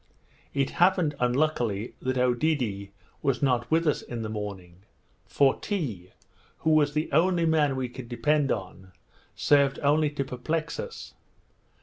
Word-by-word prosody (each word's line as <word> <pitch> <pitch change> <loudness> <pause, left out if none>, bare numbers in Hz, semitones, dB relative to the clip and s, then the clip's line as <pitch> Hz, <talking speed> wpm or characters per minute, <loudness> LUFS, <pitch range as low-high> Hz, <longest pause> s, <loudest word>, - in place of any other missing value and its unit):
It 135 -1 +1
happened 180 -4 +4
unluckily 125 -5 0
that 130 0 -1
Oedidee 125 -6 0 0.3
was 135 -2 0
not 125 -3 +1
with 165 +1 +2
us 150 - +1
in 120 -2 -6
the 110 - -4
morning; 95 -5 -6 0.5
for 140 -2 +2
Tee, 120 - -4 0.6
who 160 - +4
was 150 -2 +3
the 155 +1 -1
only 170 +3 +3
man 150 -4 +2
we 130 -1 -2
could 125 -1 -10
depend 140 +4 +1
on, 95 -2 -5 0.4
served 140 -2 +3
only 150 +2 +3
to 140 -2 -3
perplex 155 +6 -3
us. 480 -1 -7
135 Hz, 140 wpm, -27 LUFS, 120-155 Hz, 0.6 s, happened